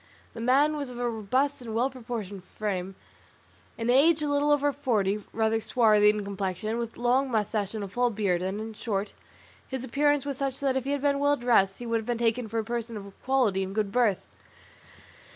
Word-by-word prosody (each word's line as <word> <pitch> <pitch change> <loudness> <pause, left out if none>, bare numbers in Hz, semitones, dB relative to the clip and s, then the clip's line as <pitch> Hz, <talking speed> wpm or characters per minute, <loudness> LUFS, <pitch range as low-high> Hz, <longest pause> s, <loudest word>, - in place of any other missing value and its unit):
The 230 - -7
man 275 +6 +3
was 285 -3 -4
of 245 - -9
a 245 0 -1
robust 250 +6 0
and 225 -3 -6
well 250 +4 +1
proportioned 225 -7 -6
frame, 190 -2 -4 0.8
in 230 +1 0
age 305 +4 +4
a - - 0
little 285 +1 +1
over 290 0 +3
forty, 215 -7 0
rather 225 0 +1
swarthy 215 -2 +4
in 210 0 0
complexion, 200 +3 -3
with 235 -1 -5
long 250 +3 +2
moustaches 210 -2 -1
and 215 - -3
a - - -4
full 245 +5 +1
beard, 200 -5 0
and, 190 +3 -2
in 220 +1 -6
short, 210 -2 -3 0.5
his 265 -2 -4
appearance 290 +3 +1
was 280 -2 -3
such 270 -1 -2
that 275 -2 0
if 265 -1 -1
he - - -3
had 285 - -2
been 280 -1 +2
well 285 0 +3
dressed 225 -6 +3
he 245 - -8
would 230 0 0
have 220 - -9
been 240 -1 0
taken 235 0 0
for 225 +2 -4
a 225 - +1
person 230 0 -4
of 200 -1 -9
quality 250 -8 +2
and 190 +1 -4
good 210 -2 0
birth. 210 -6 +1
230 Hz, 210 wpm, -27 LUFS, 210-265 Hz, 0.8 s, age